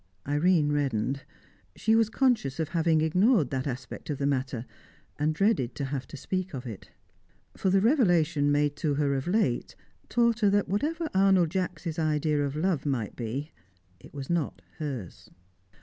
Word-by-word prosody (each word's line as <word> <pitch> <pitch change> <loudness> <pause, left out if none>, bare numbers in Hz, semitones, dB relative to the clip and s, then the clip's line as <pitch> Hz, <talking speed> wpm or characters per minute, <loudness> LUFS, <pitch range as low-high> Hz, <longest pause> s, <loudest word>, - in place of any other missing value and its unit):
Irene 150 +1 +3
reddened. 140 -2 0 0.5
She 220 - +1
was 225 -1 +3
conscious 225 - +1
of 160 -2 -1
having 165 -2 +2
ignored 180 - +3
that 130 +1 -2
aspect 130 +1 -6
of 145 - -2
the 140 - -1
matter, 130 -3 -1 0.5
and 150 +1 +2
dreaded 195 - +1
to 140 - -3
have 135 -1 -4
to 145 - -9
speak 185 +4 -3
of 130 0 -6
it. 110 -5 -8 0.7
For 190 - 0
the 190 +1 +4
revelation 170 - +3
made 145 0 +2
to 150 -4 0
her 140 -1 +1
of 135 +2 -2
late 180 - 0 0.3
taught 235 -1 +2
her 210 -3 +4
that, 205 0 +2
whatever 315 - -1
Arnold 190 -4 +4
Jacks' 180 -3 -3
idea 150 -1 +1
of 140 0 -3
love 160 -2 0
might 130 -8 -2
be, 130 +6 -4 0.5
it - - -15
was 140 -2 -7
not 170 -4 -2 0.2
hers. 135 - -6
155 Hz, 165 wpm, -28 LUFS, 140-190 Hz, 0.7 s, the